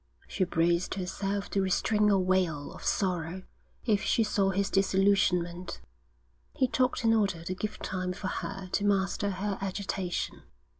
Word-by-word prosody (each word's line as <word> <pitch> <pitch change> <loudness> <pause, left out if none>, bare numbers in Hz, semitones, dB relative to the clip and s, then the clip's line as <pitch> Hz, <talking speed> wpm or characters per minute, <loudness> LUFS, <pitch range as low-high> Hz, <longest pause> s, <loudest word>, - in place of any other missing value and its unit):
She 185 - 0
braced 170 +1 +1
herself 195 +2 -3
to 195 - +1
restrain 210 +3 +2
a 200 - +5
wail 180 -6 +1
of - - -11
sorrow 180 -1 -1 0.4
if 210 -4 +2
she 225 - +2
saw 200 -2 +1
his 195 +1 0
disillusionment. 190 -2 +2 0.8
He 260 - +3
talked 255 0 +1
in 225 0 +4
order 195 -6 +1
to 180 - -3
give 210 +3 -4
time 185 -1 -3
for 185 - -5
her 195 0 -4
to 200 - 0
master 200 0 +1
her 195 +1 -2
agitation. 190 -2 -3
195 Hz, 150 wpm, -29 LUFS, 180-200 Hz, 0.8 s, a